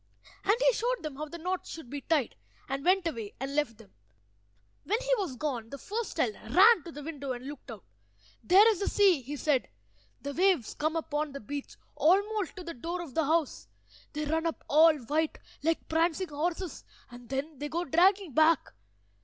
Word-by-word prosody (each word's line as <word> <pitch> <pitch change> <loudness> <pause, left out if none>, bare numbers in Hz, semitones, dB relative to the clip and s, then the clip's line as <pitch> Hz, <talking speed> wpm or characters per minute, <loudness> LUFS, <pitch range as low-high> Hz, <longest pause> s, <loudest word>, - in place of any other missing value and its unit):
And 410 - +4
he - - +4
showed 485 +1 -1
them 305 -3 -5
how 305 - -3
the 310 +3 -8
knots 365 +2 -3
should 320 -6 -8
be 280 +3 -6
tied, 295 -4 0 0.3
and 270 +1 -3
went 370 +1 +3
away 230 -11 -4
and 270 +2 -4
left 295 -7 0
them. 220 -4 -17 0.9
When 430 +4 0
he - - 0
was 350 -10 -3
gone 245 -5 -3
the 280 - -7
first 440 - -4
child 430 - +1 0.2
ran 410 +1 +8
to 340 - -7
the 295 -1 -9
window 280 -4 -4
and 245 +1 -8
looked 285 -1 -9
out. 220 -5 -9 0.6
"There 390 +5 +6
is 425 -5 +1
the 400 - -1
sea," 385 -8 +4
he 275 +4 -6
said. 285 -2 0 0.5
"The 285 0 -5
waves 355 - +2
come 310 +2 -1
up 320 -2 -4
on 295 -1 -1
the 280 - -6
beach, 280 +5 -7 0.2
almost 390 +7 +2
to 365 - -7
the 335 -1 -6
door 335 +8 -4
of 290 -7 -11
the 320 +2 +1
house. 315 -1 0 0.5
They 300 0 -2
run 320 +2 0
up 330 - -4
all 315 +2 +6
white, 305 +6 -1 0.2
like 325 +2 0
prancing 335 +2 +1
horses, 330 +3 -3 0.3
and 245 -1 -12
then 275 +2 -4
they 295 0 -4
go 340 +3 -2
dragging 365 +2 +3
back. 315 - +3
315 Hz, 200 wpm, -29 LUFS, 280-360 Hz, 0.9 s, ran